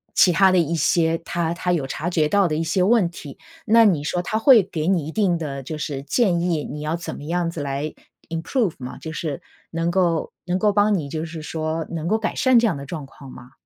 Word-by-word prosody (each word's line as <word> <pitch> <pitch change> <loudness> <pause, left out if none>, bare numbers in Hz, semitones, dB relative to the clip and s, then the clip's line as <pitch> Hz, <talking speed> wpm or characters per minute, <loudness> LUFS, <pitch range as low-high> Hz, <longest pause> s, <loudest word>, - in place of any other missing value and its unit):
其 180 - +6
它 190 +2 +5
的 185 - +3
一 170 -1 +1
些 165 +1 +2
它 170 0 -2
它 180 +1 -2
有 155 -6 0
察 160 +5 -3
觉 155 -3 +1
到 200 +2 +3
的 155 - -1
一 160 - -1
些 170 +3 0
问 205 0 +4
题， 145 -4 -10 0.3
那 230 +1 +6
你 165 -8 +2
说 175 +4 -2
它 220 - -1
会 230 -3 +7
给 165 -4 -4
你 180 -6 +1
一 155 - -5
定 185 -4 +1
的 140 -4 -5
就 155 +4 -6
是 145 -2 -4
建 175 - +1
议， 170 -4 0
你 150 - -7
要 155 +2 -1
怎 170 - -6
么 145 - -9
样 170 +2 -1
子 165 -3 -6
来 140 +2 -3 0.4
improve 170 - -1
吗？ 125 -1 -7
就 160 - -7
是 155 -4 -4 0.3
能 165 +1 -1
够 175 -3 0
能 180 - +1
够 205 +1 +2
帮 205 -1 +3
你 150 - -4
就 160 +1 -3
是 160 -1 -8
说， 160 0 -3
能 165 -1 -3
够 215 +4 +2
改 220 0 -2
善 260 -3 +3
这 235 - +4
样 200 -7 +1
的 140 0 -8
状 155 -3 -6
况 135 0 -14
吗？ 120 +1 -13
165 Hz, 290 characters per minute, -22 LUFS, 155-185 Hz, 0.4 s, 会